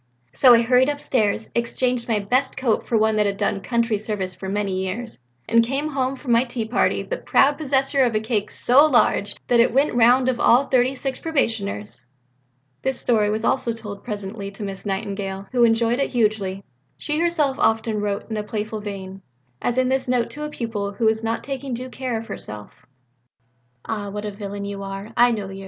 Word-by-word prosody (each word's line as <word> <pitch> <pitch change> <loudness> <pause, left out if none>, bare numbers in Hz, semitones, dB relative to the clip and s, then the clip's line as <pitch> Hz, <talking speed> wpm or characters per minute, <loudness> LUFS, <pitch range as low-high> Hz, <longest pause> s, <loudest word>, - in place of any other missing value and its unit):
So 245 - +7
I 230 - +4
hurried 250 +3 +4
upstairs, 225 -7 0
exchanged 240 +1 0
my 225 -3 +1
best 250 +7 0
coat 250 -4 0
for 230 - +2
one 220 0 +2
that 210 -1 +3
had 200 0 -2
done 195 - -1
country 230 -1 0
service 200 -4 -3
for 190 +2 -7
many 195 -2 -1
years 220 - -5 0.3
and 230 0 +4
came 275 +6 -2
home 270 -2 -1
from 260 -2 -5
my 235 +1 +5
tea 240 -3 -4
party 220 - +1
the - - -4
proud 285 - +2
possessor 275 -1 +1
of 235 -3 +1
a - - +3
cake 215 -2 -2
so 260 +4 +4
large 220 -6 +2
that 240 - +3
it 235 - +5
went 275 +5 +2
the - - -3
round 245 +2 +5
of 255 -2 0
all 245 +4 +5
the 275 - -15
thirty 255 +1 +3
six 265 0 -4
probationers." 205 - -2 0.8
This 265 -1 0
story 220 -4 +2 0.2
also 235 -1 +1
was 225 - -10
told 205 -3 -8
presently 200 -2 -5
to 200 +1 -8
Miss 195 0 -6
Nightingale, 195 0 -3
who 245 -2 +3
enjoyed 230 +1 +3
it 275 - 0
hugely. 210 -4 0 0.3
She 300 0 -1
herself 320 -5 +1
often 220 -1 +1
wrote 205 -1 -2
in 220 - -2
a 210 - -2
playful 215 +1 -4
vein; 195 -2 -7 0.4
as 245 - -1
in 255 0 +2
this 265 0 0
note 245 -2 0
to 300 - -8
a 300 - -3
pupil 220 -7 -4
who 225 +3 -2
was 220 0 +2
not 225 +1 -2
taking 270 -2 -4
due 255 +2 -6
care 255 -2 -3
of 225 - -6
herself: 105 - -5 1.0
"Ah, 210 -2 -4
what 210 +1 -5
a 210 - -3
villain 200 0 -6
you 200 0 -5
are! 195 +2 -6
_I 240 0 +5
knowed 205 -4 -3
yer! 195 - -8
230 Hz, 210 wpm, -22 LUFS, 205-255 Hz, 1.0 s, So